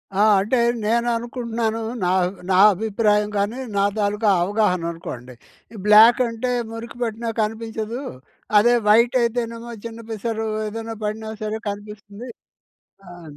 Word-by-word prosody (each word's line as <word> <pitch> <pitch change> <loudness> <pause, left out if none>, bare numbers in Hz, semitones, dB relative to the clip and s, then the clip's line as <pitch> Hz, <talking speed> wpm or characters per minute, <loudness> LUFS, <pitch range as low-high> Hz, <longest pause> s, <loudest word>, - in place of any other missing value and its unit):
ఆ! - - -1 0.2
అంటే 230 +6 0 0.2
నేననుకుంటున్నాను, 235 0 -1 0.2
నా 180 - +1 0.2
అబ్ 185 +2 -5
నా 185 - +4 0.2
అభిప్రాయం 210 +1 +1
గానీ, 205 +5 -1 0.2
నా 200 - +3
తాలూకా 210 +1 +1
అవగాహననుకోండి. 170 - -2 0.4
ఈ - - -8
బ్లాక్ 220 +4 +8
అంటే 230 +2 -3 0.2
మురికి 230 +1 -8
పట్టిన 230 0 -3
కనిపించదు. 225 +2 -4 0.6
అదే 240 +3 +4
వైట్ 235 +4 +5
అయితేనేమో 235 0 -3
చిన్న 230 0 -7
పిసరు 220 +1 -3 0.2
ఏదైనా 225 +1 -6
పడినా 220 +1 -4
సరే 215 +1 -3
కనిపిస్తుంది. 205 +3 -9 0.8
ఆహ్ 170 -4 -12
220 Hz, 120 wpm, -22 LUFS, 205-230 Hz, 0.8 s, బ్లాక్